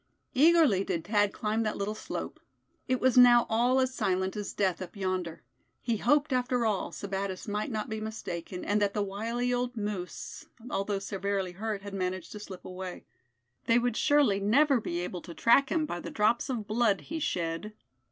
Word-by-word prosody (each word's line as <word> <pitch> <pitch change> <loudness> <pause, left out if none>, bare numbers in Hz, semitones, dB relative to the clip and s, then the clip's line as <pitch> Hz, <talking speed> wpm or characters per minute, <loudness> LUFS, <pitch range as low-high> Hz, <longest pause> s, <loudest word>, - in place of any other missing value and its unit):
Eagerly 300 - +5
did 175 -5 -3
Thad 205 -1 +2
climb 215 +1 -1
that 215 -1 -1
little 200 +1 -2
slope. 215 - -6 0.5
It 255 0 +1
was 255 -1 +4
now 240 -1 +7
all 245 +4 +3
as 260 0 +1
silent 190 -4 0
as 205 -1 -4
death 190 -3 0
up 185 - -7
yonder. 185 -4 -3 0.4
He 235 -2 -1
hoped 290 +6 +2
after 250 -1 +1
all, 210 -3 0
Sebattis 195 -1 -4
might 210 +6 -2
not 215 -3 -3
be 220 0 -4
mistaken, 185 -5 -5
and 210 +1 +1
that 200 -1 +1
the 205 - +1
wily 230 +5 -2
old 245 0 -2
moose, 205 -4 -5 0.2
although 195 +1 -1
severely 195 -1 -2
hurt, 205 +2 -4
had 200 -1 -7
managed 185 -2 -3
to 210 - -7
slip 195 -3 -10
away. 185 0 -7 0.6
They 230 - +5
would 240 -1 +1
surely 285 -10 +3
never 255 +6 +3
be 175 -4 -3
able 180 0 -5
to 170 - -10
track 270 +4 +4
him 315 -2 +1
by 175 - -4
the - - -6
drops 215 +5 +1
of 235 -5 -2
blood 215 -2 +2
he 325 0 -5
shed. 175 - -2
210 Hz, 185 wpm, -29 LUFS, 195-240 Hz, 0.6 s, now